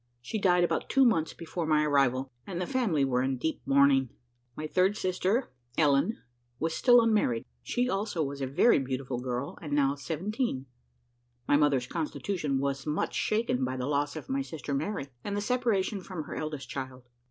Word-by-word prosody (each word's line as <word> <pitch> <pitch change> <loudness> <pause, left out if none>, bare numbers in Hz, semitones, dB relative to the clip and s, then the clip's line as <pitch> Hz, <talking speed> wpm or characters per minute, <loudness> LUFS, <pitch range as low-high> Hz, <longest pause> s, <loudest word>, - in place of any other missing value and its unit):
She 215 - -4
died 180 -2 +4
about 175 - 0
two 270 -1 +5
months 165 -10 +2
before 165 0 -4
my 155 -1 +3
arrival, 135 -2 +2 0.2
and 180 -3 -4
the 180 - -1
family 205 - +1
were 125 -2 +1
in 130 0 0
deep 160 +5 -2
mourning. 135 -2 +4 0.5
My 155 - -5
third 185 +6 +2
sister, 185 - 0 0.3
Ellen, 145 +8 +3 0.4
was 160 +3 -1
still 245 +4 +6
unmarried; 210 - +2 0.2
she, 245 - 0
also, 195 -7 -1
was 140 0 -5
a 135 - -1
very 145 - +4
beautiful 130 -1 -3
girl, 125 +2 -4
and 150 -3 -5
now 140 -1 +3
seventeen. 165 - -3 0.8
My - - +4
mother's 145 -4 +3
constitution 155 0 -2
was 140 +1 -2
much 150 +1 -1
shaken 215 - 0
by 130 0 -2
the 125 - -2
loss 145 0 0
of - - -7
my 270 +1 0
sister 160 - -5
Mary, 155 +3 -2 0.2
and 205 0 -3
the - - +1
separation 210 -3 0
from 180 -4 -6
her - - -8
eldest 155 -3 -4
child. 130 -2 -6
150 Hz, 180 wpm, -29 LUFS, 135-195 Hz, 0.8 s, still